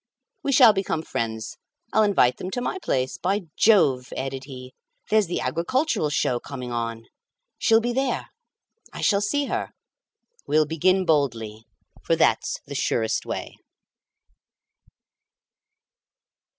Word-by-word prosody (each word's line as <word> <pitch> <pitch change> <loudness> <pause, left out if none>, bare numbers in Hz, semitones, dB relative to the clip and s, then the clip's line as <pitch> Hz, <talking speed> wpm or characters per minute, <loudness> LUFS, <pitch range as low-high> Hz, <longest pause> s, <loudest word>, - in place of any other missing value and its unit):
We 280 - -1
shall 245 -4 +7
become 190 -5 -2
friends; 110 -5 -4 0.4
I'll 220 - +4
invite 195 -12 +3
them 185 - -5
to - - -1
my 380 +9 -3
place. 130 - -2
By 195 +3 0
Jove!" 135 - +3
added 135 0 -4
he, 130 -2 -10 0.4
"there's 215 -3 +4
the 175 - -2
agricultural 175 - 0
show 125 -4 0
coming 125 -3 -7
on. 115 -1 -3 0.6
She'll 225 0 +4
be 240 +1 -1
there. 265 0 -1 0.6
I - - -8
shall 200 -3 +3
see 285 +7 0
her. - - -3 0.8
We'll 155 +1 +3
begin 185 +5 +2
boldly, 115 -9 0 0.4
for - - +1
that's - - +1
the - - -8
surest 110 -1 -1
way." - - -5
155 Hz, 125 wpm, -24 LUFS, 125-215 Hz, 0.8 s, shall